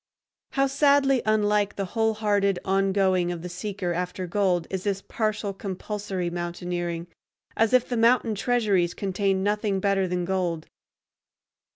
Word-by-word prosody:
How 275 -1 +3
sadly 275 -1 +3
unlike 210 -1 +2
the 195 - -2
whole 220 -1 +1
hearted 205 -3 +1
ongoing 190 -2 +2
of 170 -1 -6
the 180 - -5
seeker 180 0 -3
after 180 +1 -3
gold 180 -2 +1
is 190 -1 -3
this 200 -1 -2
partial, 215 -2 -2
compulsory 195 -2 -4
mountaineering!—as 175 +4 -4
if 255 -1 +4
the 245 - -2
mountain 230 0 +3
treasuries 205 -6 +1
contained 195 -1 0
nothing 205 -1 0
better 195 -1 +1
than 180 0 -1
gold! 175 -4 -1
195 Hz, 135 wpm, -25 LUFS, 180-215 Hz, -, if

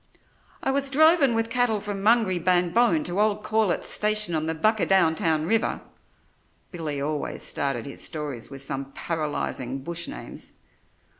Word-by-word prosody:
"I - - +1
was 275 0 +1
drovin' 300 -3 +5
with 225 0 -1
cattle 245 -3 +2
from 200 -1 -5
Mungrybanbone 185 -3 +3
to 180 +3 0
old 210 0 +1
Corlett's 215 -3 0
station 210 -3 +1
on 155 0 -1
the 160 - -1
Buckadowntown 165 -5 +2
River" 225 +5 +1 0.9
(Billy 155 -5 -4
always 150 +1 -3
started 135 -5 -2
his 140 - -7
stories 150 -7 -5
with 135 0 -6
some 135 0 -5
paralysing 145 -5 -3
bush 170 +2 -1
names). - - -8
175 Hz, 135 wpm, -25 LUFS, 155-220 Hz, 0.9 s, drovin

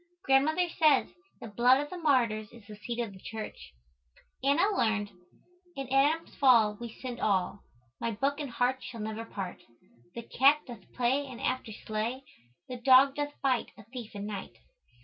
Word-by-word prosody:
Grandmother 310 +6 +3
says 310 -5 +3 0.3
"the - - -7
blood 245 +5 +4
of 290 +1 -4
the 365 - -5
martyrs 235 -9 +1
is 235 -3 -15
the 210 0 -10
seed 235 +3 -6
of 220 -4 -5
the 190 - -13
church." 220 0 -7 0.7
Anna 335 +10 +3
learned 215 - 0 0.6
"In 270 -1 -5
Adam's 295 +5 +2
fall 230 -6 +4
we 235 -1 -6
sinned 245 +1 -7
all. 195 -1 0 0.4
My 230 - -1
Book 275 +7 -1
and 290 -3 -4
heart 250 +2 0
shall 230 -3 -8
never 220 +1 -4
part. 195 -5 -6 0.5
The 235 - -5
Cat 280 +6 +4
doth 240 -2 -12
play 260 +3 +1
and 255 -3 -9
after 255 -3 -2
slay. 220 +5 -4 0.4
The 250 - -6
Dog 260 +2 +6
doth 290 0 -4
bite 260 -3 0
a - - -13
thief 235 -5 -8
at 200 - -5
night." 205 -2 -6
245 Hz, 170 wpm, -30 LUFS, 220-275 Hz, 0.7 s, Dog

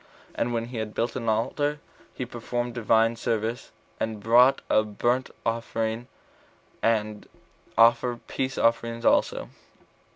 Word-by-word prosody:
And 120 - -1
when 115 -1 -1
he 120 0 -7
had 110 -1 -4
built 115 - -1
an 115 -3 -2
altar, 145 +7 0 0.4
he 125 - -3
performed 120 0 -4
Divine 115 -1 +2
service, 115 +1 -2 0.3
and 110 -1 -2
brought 120 +5 +5
a 110 - +4
burnt 120 +5 -1 0.2
offering, 115 0 -2 0.7
and 110 -2 0 0.5
offered 120 +1 +4
peace 135 0 -3
offerings 115 0 +1
also. - - +2
115 Hz, 125 wpm, -26 LUFS, 110-120 Hz, 0.7 s, brought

